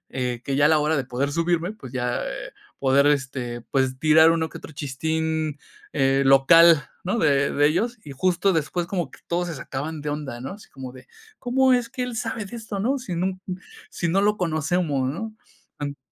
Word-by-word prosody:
eh, 125 Hz, -2 st, -3 dB
que 135 Hz, -, -2 dB
ya 145 Hz, +1 st, +4 dB
a -, -, +4 dB
la 160 Hz, -, +4 dB
hora 155 Hz, +1 st, +1 dB
de 130 Hz, -, -1 dB
poder 135 Hz, +3 st, -2 dB
subirme, 170 Hz, +3 st, 0 dB
pues 135 Hz, -, -11 dB
ya, 125 Hz, -1 st, -1 dB
eh, -, -, -6 dB, 0.3 s
poder, 140 Hz, +1 st, +3 dB
este, 130 Hz, -4 st, -1 dB
pues 130 Hz, -1 st, +1 dB
tirar 160 Hz, +2 st, +6 dB
uno 160 Hz, -1 st, 0 dB
que -, -, -8 dB
otro -, -, -11 dB
chistín, 155 Hz, +2 st, -2 dB, 0.3 s
eh, 135 Hz, -1 st, +2 dB
local, 150 Hz, +3 st, +6 dB, 0.2 s
¿no? 200 Hz, +6 st, 0 dB
De 140 Hz, -4 st, +2 dB
de 145 Hz, +1 st, +3 dB
ellos, 220 Hz, +10 st, 0 dB
y 145 Hz, -, -9 dB
justo 185 Hz, +6 st, +1 dB
después 170 Hz, +1 st, -1 dB
como 175 Hz, -3 st, -2 dB
que -, -, -16 dB
todos 175 Hz, +1 st, -1 dB
se 165 Hz, -, -4 dB
sacaban 145 Hz, +4 st, -5 dB
de 150 Hz, -, -2 dB
onda, 145 Hz, -5 st, -5 dB
¿no? 130 Hz, -, -5 dB
Así 205 Hz, +1 st, -13 dB
como 130 Hz, -2 st, -8 dB
de: 130 Hz, -, -14 dB, 0.3 s
"¿Cómo 260 Hz, +1 st, +3 dB
es 245 Hz, -2 st, +2 dB
que 250 Hz, -, -4 dB
él 250 Hz, -2 st, -4 dB
sabe 225 Hz, -2 st, -3 dB
de 220 Hz, +5 st, -8 dB
esto, 215 Hz, -3 st, -5 dB
no? 265 Hz, +6 st, +1 dB
Si 205 Hz, -8 st, -5 dB
no 185 Hz, +2 st, -1 dB, 0.5 s
si 170 Hz, -, -2 dB
no 185 Hz, +4 st, +2 dB
lo 210 Hz, +1 st, +2 dB
conocemos, 155 Hz, -5 st, 0 dB
¿no?". 210 Hz, +11 st, -4 dB, 0.5 s
Ant 145 Hz, -1 st, -4 dB
160 Hz, 210 wpm, -24 LUFS, 135-185 Hz, 0.5 s, tirar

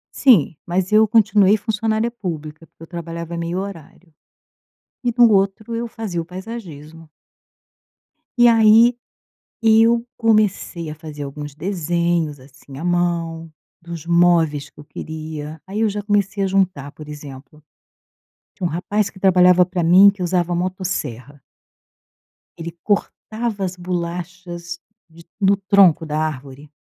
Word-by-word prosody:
Sim, 205 Hz, -, +4 dB
mas 180 Hz, +2 st, -1 dB
eu 215 Hz, +1 st, +5 dB
continuei 210 Hz, -2 st, +4 dB
funcionária 220 Hz, +1 st, -1 dB
pública, 165 Hz, -8 st, -7 dB
porque 160 Hz, -, -33 dB
eu -, -, -11 dB
trabalhava 170 Hz, -1 st, -6 dB
em -, -, -5 dB
1/2 170 Hz, +2 st, -3 dB
horário, 185 Hz, -3 st, -9 dB, 0.9 s
e 240 Hz, -1 st, 0 dB
no 240 Hz, -2 st, +6 dB
outro 200 Hz, +4 st, 0 dB
eu 235 Hz, 0 st, -3 dB
fazia 205 Hz, -7 st, -4 dB
o -, -, -5 dB
paisagismo. 165 Hz, -5 st, -9 dB, 1.3 s
E 240 Hz, -, +6 dB
aí, 230 Hz, +1 st, +6 dB, 0.7 s
eu 225 Hz, +1 st, +4 dB
comecei 210 Hz, -7 st, 0 dB
a -, -, -6 dB
fazer 150 Hz, -2 st, -9 dB
alguns 145 Hz, +1 st, -7 dB
desenhos, 170 Hz, -3 st, -1 dB
assim, 135 Hz, 0 st, -14 dB
à 165 Hz, -, -6 dB
mão 170 Hz, -2 st, -1 dB, 0.3 s
dos 170 Hz, -1 st, -9 dB
móveis 170 Hz, -4 st, +2 dB
que -, -, -29 dB
eu -, -, -12 dB
queria, 155 Hz, 0 st, -7 dB
aí 205 Hz, +3 st, -4 dB
eu 220 Hz, -, +3 dB
já 205 Hz, 0 st, -4 dB
comecei 205 Hz, -1 st, 0 dB
a -, -, +2 dB
juntar, 185 Hz, -7 st, 0 dB
por 150 Hz, -1 st, -12 dB
exemplo, 145 Hz, 0 st, -11 dB, 0.9 s
tinha 180 Hz, -4 st, -3 dB
um -, -, -5 dB
rapaz 200 Hz, +4 st, -1 dB
que 190 Hz, -, -16 dB
trabalhava 180 Hz, -1 st, +5 dB
pra 180 Hz, -1 st, -3 dB
mim 185 Hz, +4 st, +7 dB
que 200 Hz, -2 st, -5 dB
usava 175 Hz, -1 st, 0 dB
motosserra. 170 Hz, -, -4 dB, 1.2 s
Ele 165 Hz, 0 st, -6 dB
cortava 215 Hz, 0 st, -2 dB
as 185 Hz, -1 st, -3 dB
bolachas 175 Hz, 0 st, -5 dB, 0.3 s
de 165 Hz, +1 st, -17 dB
no 200 Hz, 0 st, +4 dB
tronco 195 Hz, -5 st, +4 dB
da 155 Hz, 0 st, -3 dB
árvore. 145 Hz, -1 st, -5 dB
175 Hz, 140 wpm, -20 LUFS, 160-200 Hz, 1.3 s, mim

